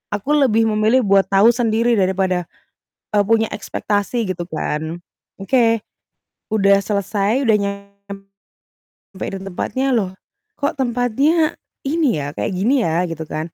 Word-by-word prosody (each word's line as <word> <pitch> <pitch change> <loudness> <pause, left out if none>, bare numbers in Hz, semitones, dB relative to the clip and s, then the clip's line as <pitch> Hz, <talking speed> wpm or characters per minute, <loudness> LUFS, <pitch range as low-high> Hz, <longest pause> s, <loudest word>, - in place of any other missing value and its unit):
aku 210 +8 -3
lebih 230 -6 +3
memilih 220 +4 +3
buat 195 0 +5
tahu 200 +4 +5
sendiri 230 0 +2
daripada, 185 -1 +1 0.8
eee, - - +5
punya 225 +1 +3
ekspektasi, 205 +2 -2
gitu 175 -1 -3
kan. 160 +1 -3 0.4
Oke, 230 -1 +2 0.7
udah 200 -2 +4
selesai, 205 +4 0
udah 220 - +5
nyampe 200 0 -8 0.8
di 195 - -5
tempatnya, 225 +8 -2
"Loh, 200 -6 0 0.5
kok 285 - -1
tempatnya 265 +6 +1 0.3
ini 285 - +1
ya, 140 - -4
kayak - - -2
gini 245 +7 +2
ya?" 165 +2 +1
Gitu 165 -1 -5
kan. 155 - -4
205 Hz, 130 wpm, -19 LUFS, 195-240 Hz, 0.8 s, buat